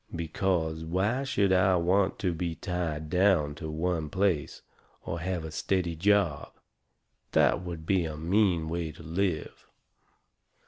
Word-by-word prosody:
Because 80 Hz, -1 st, -1 dB
why 100 Hz, +10 st, 0 dB
should 100 Hz, -8 st, +2 dB
I 95 Hz, 0 st, +4 dB
want 95 Hz, +3 st, +2 dB
to 90 Hz, -4 st, +1 dB
be 85 Hz, 0 st, -3 dB
tied 80 Hz, -4 st, -3 dB
down 90 Hz, -4 st, +3 dB
to 80 Hz, +1 st, -7 dB
one 80 Hz, 0 st, -1 dB
place, 95 Hz, -4 st, 0 dB, 0.4 s
or 85 Hz, +1 st, -4 dB
have 90 Hz, -1 st, -3 dB
a 80 Hz, -, -6 dB
steady 85 Hz, 0 st, -1 dB
job? 95 Hz, -4 st, +1 dB, 0.8 s
That -, -, +4 dB
would 85 Hz, -3 st, -7 dB
be 95 Hz, -1 st, +2 dB
a 80 Hz, -1 st, -5 dB
mean 85 Hz, 0 st, +2 dB
way 85 Hz, -1 st, -3 dB
to 80 Hz, -, -13 dB
live. 85 Hz, -1 st, -2 dB
85 Hz, 140 wpm, -28 LUFS, 80-95 Hz, 0.8 s, I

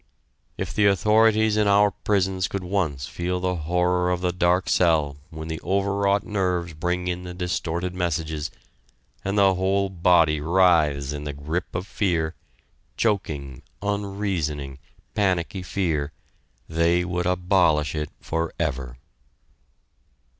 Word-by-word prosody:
If 90 Hz, -2 st, -4 dB
the 105 Hz, +2 st, +4 dB
authorities 110 Hz, +2 st, +4 dB
in 105 Hz, -1 st, +3 dB
our 100 Hz, 0 st, +5 dB
prisons 95 Hz, -2 st, 0 dB
could 95 Hz, +2 st, -4 dB
once 90 Hz, -9 st, -1 dB
feel 90 Hz, +6 st, -3 dB
the 90 Hz, 0 st, 0 dB
horror 90 Hz, +2 st, +1 dB
of 90 Hz, -1 st, -1 dB
the 90 Hz, -1 st, +1 dB
dark 90 Hz, +1 st, +1 dB
cell 80 Hz, -5 st, +2 dB
when 80 Hz, 0 st, -7 dB
the 80 Hz, -1 st, -5 dB
overwrought 100 Hz, +1 st, +1 dB
nerves 90 Hz, -4 st, -1 dB
bring 90 Hz, +3 st, -2 dB
in 90 Hz, 0 st, -2 dB
the 90 Hz, -1 st, -7 dB
distorted 90 Hz, 0 st, -2 dB
messages, 80 Hz, -3 st, -2 dB, 0.7 s
and 100 Hz, +1 st, -1 dB
the 100 Hz, -1 st, +5 dB
whole 95 Hz, +2 st, +1 dB
body 85 Hz, -4 st, +3 dB
writhes 75 Hz, -5 st, +3 dB
in 75 Hz, 0 st, -6 dB
the 75 Hz, -, -4 dB
grip 75 Hz, +6 st, -4 dB
of 90 Hz, +2 st, -2 dB
fear, 85 Hz, -6 st, 0 dB, 0.6 s
choking, 75 Hz, -, -1 dB, 0.2 s
unreasoning, 95 Hz, -9 st, -2 dB, 0.3 s
panicky 95 Hz, -2 st, 0 dB
fear, 80 Hz, -5 st, -1 dB, 0.6 s
they 85 Hz, +2 st, +2 dB
would 90 Hz, 0 st, -1 dB
abolish 90 Hz, -5 st, +2 dB
it 75 Hz, -1 st, -3 dB
forever. 75 Hz, -6 st, -3 dB
90 Hz, 125 wpm, -24 LUFS, 80-95 Hz, 0.7 s, our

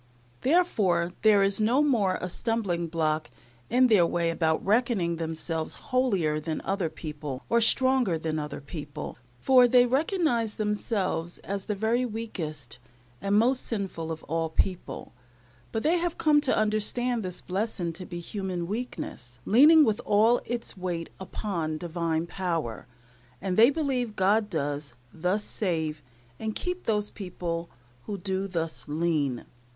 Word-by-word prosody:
Therefore, 205 Hz, -, +2 dB
there 210 Hz, -2 st, +5 dB
is 195 Hz, +2 st, +1 dB
no 245 Hz, +7 st, +3 dB
more 210 Hz, -10 st, +2 dB
a 180 Hz, -, -3 dB
stumbling 185 Hz, -4 st, -1 dB
block 155 Hz, -2 st, -1 dB, 0.4 s
in 255 Hz, +2 st, +5 dB
their 215 Hz, -7 st, +5 dB
way 170 Hz, 0 st, +1 dB
about 160 Hz, -1 st, 0 dB
reckoning 205 Hz, -6 st, +2 dB
themselves 160 Hz, 0 st, -2 dB
holier 195 Hz, -13 st, 0 dB
than 155 Hz, +1 st, -3 dB
other 190 Hz, -4 st, -1 dB
people, 150 Hz, -4 st, -6 dB
or 235 Hz, 0 st, +3 dB
stronger 255 Hz, -5 st, +4 dB
than 160 Hz, -1 st, -2 dB
other 150 Hz, -1 st, -5 dB
people, 145 Hz, -3 st, -7 dB, 0.2 s
for 250 Hz, -, +6 dB
they 245 Hz, 0 st, +6 dB
recognize 265 Hz, -, +1 dB
themselves 205 Hz, -5 st, -1 dB
as 195 Hz, 0 st, -4 dB
the 210 Hz, -, -2 dB
very 225 Hz, +5 st, +1 dB
weakest 160 Hz, -, -5 dB, 0.4 s
and 200 Hz, +1 st, +2 dB
most 250 Hz, +4 st, +4 dB
sinful 190 Hz, -7 st, -3 dB
of 160 Hz, -, -6 dB
all 165 Hz, +1 st, -1 dB
people: 180 Hz, +3 st, -2 dB, 0.6 s
but 225 Hz, -, -2 dB
they 335 Hz, +3 st, +3 dB
have 345 Hz, -1 st, -2 dB
come 300 Hz, -1 st, +4 dB
to 280 Hz, -, +1 dB
understand 215 Hz, +3 st, 0 dB
this 180 Hz, -3 st, -3 dB
blessing 185 Hz, -3 st, -2 dB
to 185 Hz, +3 st, -8 dB
be 175 Hz, -1 st, -6 dB
human 185 Hz, -1 st, -4 dB
weakness, 170 Hz, -, -5 dB
leaning 300 Hz, +8 st, +7 dB
with 220 Hz, 0 st, 0 dB
all 220 Hz, +4 st, +4 dB
its 240 Hz, 0 st, -3 dB
weight 175 Hz, -3 st, -4 dB
upon 175 Hz, -5 st, -3 dB
Divine 165 Hz, -1 st, -2 dB
power; 170 Hz, -, -3 dB, 0.5 s
and 185 Hz, +6 st, -2 dB
they 230 Hz, +5 st, +7 dB
believe 265 Hz, -7 st, -1 dB
God 205 Hz, +3 st, +2 dB
does 145 Hz, -5 st, -3 dB, 0.2 s
thus 180 Hz, +5 st, 0 dB
save 160 Hz, -8 st, -2 dB, 0.4 s
and 220 Hz, -1 st, -3 dB
keep 360 Hz, 0 st, -3 dB
those 210 Hz, -2 st, +1 dB
people 170 Hz, -3 st, -4 dB, 0.4 s
who 205 Hz, -, -3 dB
do 190 Hz, +1 st, -2 dB
thus 165 Hz, -8 st, -3 dB
lean. 150 Hz, -5 st, 0 dB
190 Hz, 145 wpm, -27 LUFS, 165-230 Hz, 0.6 s, leaning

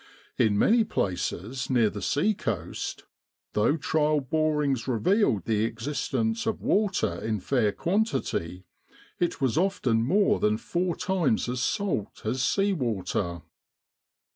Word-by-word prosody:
In 105 Hz, -2 st, +3 dB
many 225 Hz, -, +4 dB
places 100 Hz, -, -2 dB
near 120 Hz, -5 st, +3 dB
the 105 Hz, -, -6 dB
sea 150 Hz, -, +1 dB
coast, 110 Hz, -, -4 dB, 0.5 s
though 105 Hz, +9 st, +2 dB
trial 155 Hz, -2 st, +1 dB
borings 145 Hz, -3 st, 0 dB
revealed 125 Hz, -, +2 dB
the 110 Hz, -1 st, +1 dB
existence 115 Hz, -1 st, -2 dB
of -, -, -1 dB
water 205 Hz, -2 st, +1 dB
in 110 Hz, -2 st, -1 dB
fair 110 Hz, +1 st, +1 dB
quantity, 130 Hz, -, -1 dB, 0.5 s
it 175 Hz, -, 0 dB
was 135 Hz, +2 st, +1 dB
often 170 Hz, -, +1 dB
more 195 Hz, -, +3 dB
than 105 Hz, 0 st, +2 dB
four 175 Hz, +6 st, -1 dB
times 180 Hz, -, 0 dB
as 125 Hz, 0 st, -2 dB
salt 165 Hz, -, -2 dB
as 125 Hz, +4 st, -1 dB
sea 200 Hz, +8 st, +2 dB
water. 95 Hz, -, -2 dB
130 Hz, 125 wpm, -27 LUFS, 110-175 Hz, 0.5 s, many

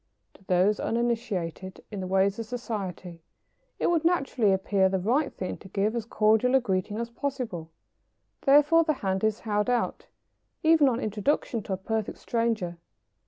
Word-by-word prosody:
To -, -, -21 dB
those 185 Hz, +3 st, +2 dB
uninitiated 205 Hz, -6 st, -2 dB
in 205 Hz, -, -5 dB
the 185 Hz, -, -4 dB
ways 195 Hz, +2 st, +2 dB
of 225 Hz, -, -5 dB
society, 195 Hz, -8 st, -5 dB, 0.6 s
it -, -, +1 dB
would 330 Hz, -2 st, +1 dB
naturally 275 Hz, -, +2 dB
appear 190 Hz, 0 st, +2 dB
the 190 Hz, -, 0 dB
right 250 Hz, +10 st, +1 dB
thing 185 Hz, -, -5 dB
to -, -, -13 dB
give 205 Hz, +4 st, -1 dB
as 230 Hz, -2 st, -2 dB
cordial 220 Hz, +3 st, +3 dB
a -, -, +6 dB
greeting 205 Hz, -3 st, -2 dB
as 235 Hz, 0 st, -4 dB
possible. 235 Hz, -, -4 dB, 0.7 s
Therefore 295 Hz, +4 st, +5 dB
the 310 Hz, -1 st, +1 dB
hand 190 Hz, +1 st, 0 dB
is 220 Hz, 0 st, +1 dB
held 210 Hz, 0 st, 0 dB
out, 245 Hz, -1 st, -1 dB, 0.6 s
even 315 Hz, -3 st, +5 dB
on 240 Hz, -2 st, -1 dB
introduction 220 Hz, +2 st, -1 dB
to 195 Hz, -, -4 dB
a -, -, -1 dB
perfect 220 Hz, +2 st, -3 dB
stranger. 220 Hz, -7 st, -1 dB
215 Hz, 165 wpm, -27 LUFS, 190-245 Hz, 0.7 s, a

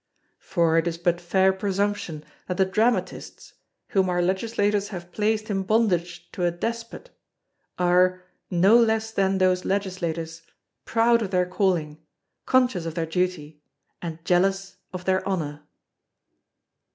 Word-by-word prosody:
For 165 Hz, -3 st, +2 dB
it 165 Hz, -, -1 dB
is 165 Hz, -1 st, -2 dB
but 175 Hz, 0 st, 0 dB
fair 190 Hz, +2 st, +3 dB
presumption 195 Hz, -5 st, -2 dB, 0.2 s
that 180 Hz, -, -3 dB
the 190 Hz, -, +4 dB
Dramatists, 220 Hz, +6 st, -1 dB, 0.4 s
whom 190 Hz, -2 st, +2 dB
our 175 Hz, 0 st, 0 dB
Legislators 205 Hz, +2 st, 0 dB
have 175 Hz, -4 st, -8 dB
placed 215 Hz, +2 st, -1 dB
in 195 Hz, -1 st, 0 dB
bondage 175 Hz, -5 st, 0 dB
to 180 Hz, -, -4 dB
a 175 Hz, -, +3 dB
despot, 230 Hz, -, -5 dB, 0.7 s
are, 180 Hz, +1 st, +3 dB, 0.3 s
no 185 Hz, +5 st, +4 dB
less 220 Hz, -1 st, +2 dB
than 195 Hz, -2 st, +1 dB
those 185 Hz, -1 st, +2 dB
Legislators, 170 Hz, -4 st, -3 dB, 0.4 s
proud 230 Hz, +1 st, +3 dB
of 210 Hz, -, -2 dB
their 180 Hz, -1 st, +1 dB
calling, 180 Hz, -5 st, -1 dB, 0.5 s
conscious 245 Hz, -10 st, +2 dB
of 165 Hz, -, -5 dB
their 165 Hz, -2 st, -1 dB
duty, 160 Hz, -3 st, -3 dB, 0.4 s
and 165 Hz, -1 st, -7 dB
jealous 195 Hz, +2 st, +1 dB
of 180 Hz, -1 st, -7 dB
their 190 Hz, 0 st, +1 dB
honour. 150 Hz, -6 st, -3 dB
185 Hz, 135 wpm, -24 LUFS, 175-205 Hz, 0.7 s, the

